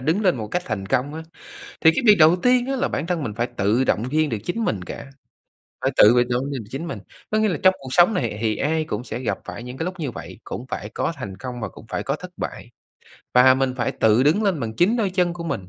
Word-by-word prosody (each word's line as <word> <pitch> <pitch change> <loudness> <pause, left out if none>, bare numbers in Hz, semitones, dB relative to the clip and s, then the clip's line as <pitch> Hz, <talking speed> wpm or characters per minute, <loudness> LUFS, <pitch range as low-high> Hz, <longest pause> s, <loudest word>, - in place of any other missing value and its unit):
đứng 160 +10 0
lên 185 -8 +3
một 110 - -4
cách 180 +8 -2
thành 100 -4 -3
công 130 +6 0
á, 160 - -6 0.6
thì 160 - +7
cái - - 0
việc 210 -1 +8
đầu 160 +3 +6
tiên 250 +5 +2
á 270 0 -1
là 275 +2 0
bản 155 - -3
thân 170 -3 -1
mình 110 -7 -4
phải 120 +2 -1
tự 105 +6 +2
động 110 - +1
viên 155 +1 +2
được 115 - -2
chính 225 +6 -2
mình 100 - -1
cả, - - -8 0.8
phải - - +1
tự 105 - +8
việc 120 0 +3
động 125 +1 0
viên 130 -5 -4
được 105 - -17
chính 155 +6 -5
mình. - - -5 0.3
Có 215 - +2
nghĩa 215 - +3
là 165 - -1
trong 185 0 +7
cuộc 135 - -9
sống 175 +8 +5
này 120 - -2
thì 110 -2 +1
ai 155 +3 0
cũng 115 -6 -4
sẽ 125 - -5
gặp 125 - -2
phải 120 - -7
những 125 +1 -8
cái 160 - -3
lúc 185 0 -5
như 140 -6 -3
vậy, - - -9
cũng 125 - -6
phải 105 - -5
có 165 - -2
thành 100 -9 -7
công 125 0 -7
và 105 - -3
cũng - - -14
phải - - -3
có - - -1
thất - - -10
bại, - - -6 0.7
và 130 +1 +7
mình 130 -1 0
phải 125 - -1
tự 110 +3 +3
đứng 155 +10 +3
lên 195 -7 +1
bằng 110 -2 -4
chính 205 +7 +3
đôi 210 -5 0
chân 180 -2 +1
của 170 -1 -7
mình. 95 - -4
140 Hz, 285 wpm, -22 LUFS, 120-175 Hz, 0.8 s, việc